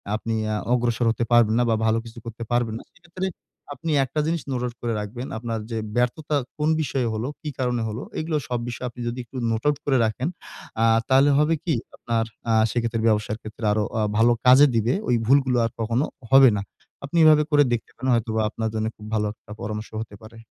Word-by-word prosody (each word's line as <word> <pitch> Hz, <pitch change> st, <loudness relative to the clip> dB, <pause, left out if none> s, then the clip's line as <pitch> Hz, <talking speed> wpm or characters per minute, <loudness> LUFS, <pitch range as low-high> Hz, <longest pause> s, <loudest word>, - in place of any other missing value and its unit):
আপনি 115 Hz, +1 st, -3 dB
অ্যা 105 Hz, 0 st, -1 dB, 0.2 s
অগ্রসর 120 Hz, -1 st, +1 dB
হতে 115 Hz, -, -2 dB
পারবেন 115 Hz, -2 st, +5 dB
না -, -, +4 dB
বা 115 Hz, -, +3 dB
ভালো 110 Hz, 0 st, +3 dB
কিছু 115 Hz, +1 st, -10 dB
করতে 115 Hz, 0 st, -6 dB
পারবেন 120 Hz, -2 st, +1 dB
না। -, -, -12 dB
সেক্ষেত্রে 180 Hz, +1 st, -7 dB, 0.5 s
আপনি 160 Hz, +4 st, -4 dB
একটা 150 Hz, +4 st, -3 dB
জিনিস 165 Hz, 0 st, -1 dB
নোট 125 Hz, -2 st, -1 dB
আউট 120 Hz, -1 st, -5 dB
করে 120 Hz, -1 st, -1 dB
রাখবেন। 120 Hz, +5 st, -6 dB
আপনার 115 Hz, -1 st, -3 dB
যে 115 Hz, -, -2 dB, 0.2 s
ব্যর্থতা 145 Hz, +5 st, 0 dB, 0.2 s
কোন 150 Hz, +1 st, +1 dB
বিষয়ে 135 Hz, -5 st, -1 dB
হলো, 110 Hz, +3 st, -2 dB
কি 150 Hz, -, -4 dB
কারণে 125 Hz, -2 st, 0 dB
হলো, 110 Hz, +3 st, -5 dB, 0.2 s
এগুলো 155 Hz, -1 st, -1 dB
সব 125 Hz, -1 st, -1 dB
বিষয়ে 125 Hz, +1 st, -4 dB
আপনি 120 Hz, +1 st, -10 dB
যদি 120 Hz, +2 st, -3 dB
একটু 130 Hz, +3 st, -10 dB
নোট 110 Hz, 0 st, -2 dB
আউট 150 Hz, -, +2 dB
করে 135 Hz, -2 st, +3 dB
রাখেন 110 Hz, +6 st, -2 dB, 0.6 s
আ -, -, +5 dB, 0.2 s
তাহলে 135 Hz, +2 st, +5 dB
হবে 150 Hz, +2 st, +3 dB
কি 165 Hz, -, 0 dB, 0.2 s
আপনার 115 Hz, -1 st, -1 dB, 0.3 s
আ -, -, +3 dB, 0.2 s
সেক্ষেত্রে 115 Hz, -2 st, -1 dB
ব্যবসার 105 Hz, 0 st, +1 dB
ক্ষেত্রে 110 Hz, +1 st, -10 dB
আরো 105 Hz, 0 st, +1 dB, 0.2 s
আ -, -, +1 dB, 0.2 s
ভালো 115 Hz, +1 st, +5 dB
কাজে 130 Hz, +3 st, +8 dB
দিবে, 115 Hz, +2 st, +2 dB
ওই 125 Hz, -, +3 dB
ভুলগুলো 130 Hz, 0 st, +3 dB
আর 115 Hz, -, -2 dB
কখনো 115 Hz, +5 st, 0 dB, 0.3 s
হবে 135 Hz, -1 st, +8 dB
না। -, -, -2 dB, 0.4 s
আপনি 170 Hz, +5 st, -3 dB
এভাবে 155 Hz, -1 st, +7 dB
করে 145 Hz, -1 st, +6 dB
দেখতে 115 Hz, -, -3 dB
পারেন 130 Hz, +2 st, -3 dB
হয়তোবা 110 Hz, -1 st, 0 dB
আপনার 110 Hz, +1 st, -3 dB
জন্য 110 Hz, 0 st, -1 dB
খুব 105 Hz, -, -12 dB
ভালো 105 Hz, -1 st, +1 dB
একটা 110 Hz, -, -18 dB
পরামর্শ 105 Hz, +1 st, -5 dB
হতে 105 Hz, -2 st, -8 dB
পারে। 110 Hz, +1 st, -13 dB
120 Hz, 215 wpm, -24 LUFS, 110-135 Hz, 0.6 s, কাজে